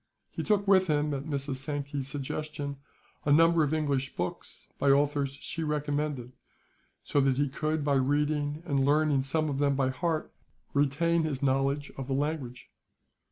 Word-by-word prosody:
He - - -4
took 205 -1 +1
with 190 -1 +5
him, 150 -1 +1
at 140 0 -4
Mrs. 140 -3 -2
Sankey's 140 0 -4
suggestion, 145 +1 -4 0.5
a 145 - +1
number 165 +2 +5
of 145 - 0
English 140 -4 -1
books, 90 +1 -5
by 140 - +3
authors 140 0 +2
she 165 - -5
recommended; 150 -4 -2 0.7
so 145 - +1
that 135 -1 +2
he 145 +1 +2
could, 155 +2 -2
by 145 - +2
reading 145 +3 0
and 140 -5 +1
learning 145 0 +3
some 155 +4 0
of 140 -2 -2
them 140 -1 +2
by 135 -1 +1
heart, 160 +3 -2 0.4
retain 150 +4 +2
his 150 -3 -2
knowledge 135 +2 +1
of 135 -1 -5
the 135 - -1
language. 140 -4 -3
145 Hz, 160 wpm, -29 LUFS, 135-155 Hz, 0.7 s, with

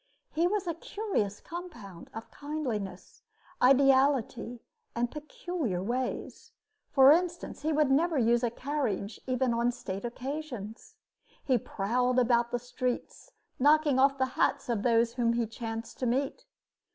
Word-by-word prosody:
He 335 +3 +2
was 405 0 -1
a 340 - -1
curious 335 - -2
compound 310 - -9
of 225 - -9
kindliness, 250 -11 -5 0.4
ideality, 265 -2 +3 0.3
and 235 0 0
peculiar 300 - -4
ways. 250 +4 -4 0.4
For 270 -1 +7
instance, 345 0 0
he 310 +2 0
would 300 -2 +2
never 320 +3 +3
use 235 -1 +3
a 240 - +1
carriage 235 -6 -3
even 255 -1 +1
on 235 +1 +2
state 200 -5 -6
occasions. 245 -3 -6 0.5
He 255 -3 +2
prowled 245 +5 0
around 240 -1 +3
the 245 - -1
streets, 245 +1 -4 0.3
knocking 295 0 +4
off 275 +1 +4
the 260 - +2
hats - - +1
of 230 -4 0
those 230 0 +3
whom 235 -2 +1
he 235 0 +1
chanced 225 0 -6
to 255 - 0
meet. 270 - -1
250 Hz, 140 wpm, -29 LUFS, 235-295 Hz, 0.5 s, For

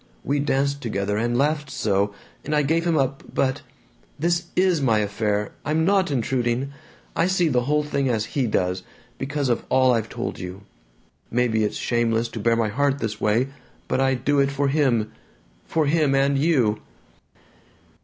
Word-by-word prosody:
We 145 +1 0
danced 140 0 0
together 105 -4 -2
and 120 +3 0
laughed 150 +1 +1
so, 100 -3 0 0.3
and 150 - -1
I 150 - +3
gave 165 +4 +1
him 165 -2 +2
up, 135 -1 0
but 130 -1 0 0.6
This 170 +3 0
IS 180 -4 +3
my 115 -5 +3
affair! 105 0 -1
I'm 155 +2 +1
NOT 195 -1 +3
intruding! 125 0 -1 0.4
I 170 - +2
see 185 -3 +2
the 125 -3 +1
whole 150 +2 +2
thing 140 -2 -1
as 110 -3 0
he 135 -4 +1
does, 90 -3 0 0.4
because 140 +1 -2
of 120 - 0
all 130 -1 +4
I've 115 -2 -1
told 120 +1 -4
you. 90 +1 -7 0.7
Maybe 115 -2 +1
it's 105 - -1
shameless 120 -1 0
to 115 - -6
bare 115 +2 +2
my 115 -2 +1
heart 140 +5 +1
this 110 -5 -4
way, 115 +5 +2 0.4
but - - 0
I 135 0 +3
do 140 +3 +1
it 140 0 +3
for 140 0 0
him 125 -7 +1 0.6
for 160 -2 +1
him 145 -2 +2
and 140 +1 +3
you!" 135 -8 +2
135 Hz, 175 wpm, -23 LUFS, 115-145 Hz, 0.7 s, all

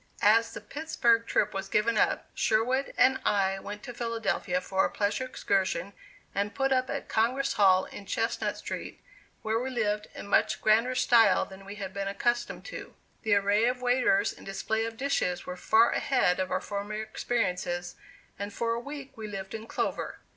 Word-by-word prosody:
As 225 +2 +5
the - - -6
Pittsburg 240 -7 +1
trip 210 0 +1
was 195 0 -4
given 220 +3 +2
up, 210 - +1
Sherwood 245 +4 +1
and 260 +1 +5
I 195 -1 +1
went 205 +2 -8
to 245 - -7
Philadelphia 225 -6 -1
for 190 +1 0
a - - +1
pleasure 205 +5 -1
excursion 195 -5 -1 0.4
and 200 +1 -2
put 270 -1 +1
up 255 0 +1
at - - -4
Congress 255 +5 +1
Hall 190 -2 +5
in 200 - -10
Chestnut 230 +1 -1
Street - - -6 0.4
where 220 +1 0
we 255 +2 -3
lived 210 -4 -1
in - - -7
much 200 - +2
grander 230 +4 +3
style 230 -4 +5
than 195 0 -13
we 200 +1 -8
had 195 -2 -6
been 200 -1 -3
accustomed 240 +4 -1
to. - - -8 0.3
The 215 -3 +3
array 200 +2 +3
of 250 +1 -1
waiters 245 -5 +3
and - - -15
display 220 +3 -2
of 225 0 -6
dishes 240 -10 -1
were 180 - -5
far 220 +5 +4
ahead 250 -10 +2
of 185 0 -1
our - - -1
former 205 +1 -4
experiences 185 -5 -2 0.5
and 200 +1 -4
for 230 +2 -1
a 230 - -2
week 280 +2 -8
we 220 -1 -6
lived 195 -2 -6
in 225 0 -6
clover. - - -2
220 Hz, 185 wpm, -29 LUFS, 195-240 Hz, 0.5 s, As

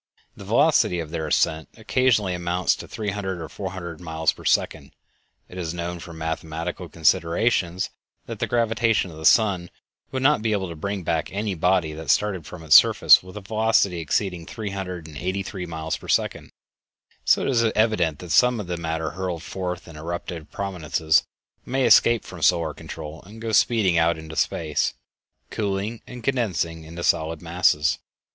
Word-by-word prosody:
The 100 - -11
velocity 115 - +3
of 80 -2 -5
their 80 -2 -3
ascent 80 +1 +1
occasionally 110 -4 +2
amounts 90 +1 0
to - - -9
three 105 -2 -3
hundred 95 -3 -4
or 80 - -6
four 95 +1 -6
hundred 85 -3 -7
miles 80 -2 0
per - - -14
second. - - 0 0.5
It 90 - -9
is 85 -1 -3
known 85 0 -4
from 85 -1 -10
mathematical 80 +2 -4
considerations 85 +3 +1 0.3
that - - -7
the - - -1
gravitation 115 -4 +1
of 80 - -12
the 80 - +2
sun 95 -6 +3 0.4
would 130 -1 -3
not 145 -4 +4
be 110 -1 0
able 95 -3 -1
to 85 - -7
bring 100 +4 -4
back 80 +2 -1
any 100 +1 -2
body 90 -2 +1
that 80 +1 -8
started 95 -7 +1
from 90 -2 -9
its 75 -1 +5
surface - - +7
with 95 +2 -11
a - - -6
velocity 110 -3 +1
exceeding 85 +1 -1
three 105 -3 -5
hundred 90 -4 -5
and 75 -2 -10
eighty 95 +5 -2
three 95 -2 -6
miles 80 -1 -3
per - - -13
second; - - 0 0.7
so - - +4
it - - -1
is 120 -3 +3
evident 105 -9 +2
that 85 +2 -8
some 120 +10 +4
of 105 - -4
the 90 0 -3
matter 80 -1 -3
hurled 90 -2 -4
forth 90 -2 -5
in 85 - -11
eruptive 85 0 -6
prominences 80 -5 0 0.4
may 130 0 0
escape 115 -2 +5
from - - -10
solar 80 -3 +3
control 80 +1 -8
and 110 +2 -12
go 110 0 -3
speeding 105 -6 +3
out 85 0 +2
into 80 0 -9
space, 75 -2 0 0.6
cooling 105 +2 -2
and 125 -1 -9
condensing 95 -11 -1
into 85 +2 -7
solid 80 0 +1
masses. 85 -3 +2
90 Hz, 180 wpm, -24 LUFS, 80-105 Hz, 0.7 s, surface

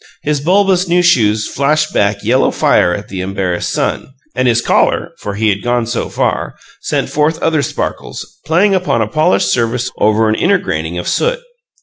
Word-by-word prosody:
His 150 -1 -1
bulbous 190 +2 +2
new 175 +1 +2
shoes 110 -10 +2
flashed 150 +3 0
back 100 0 0
yellow 125 +5 +2
fire 90 - +2
at 100 +4 -4
the 95 -1 -5
embarrassed 95 -2 -2
sun, 130 - -3 0.2
and 130 +1 +1
his 120 -1 +3
collar - - +1
(for 100 -1 -5
he 110 +1 +1
had 100 -1 -1
gone 120 -1 0
so 120 +1 -3
far) - - -2 0.3
sent - - -1
forth 150 +2 0
other 160 -2 +1
sparkles, - - -5
playing 175 +7 +2
upon 180 -12 +1
a - - -3
polished 100 -7 +1
surface 120 0 -1
over 110 +1 +3
an 110 - +2
inner 195 - +2
graining 85 - -4
of 85 - -4
soot. - - 0
120 Hz, 185 wpm, -14 LUFS, 105-160 Hz, 0.3 s, his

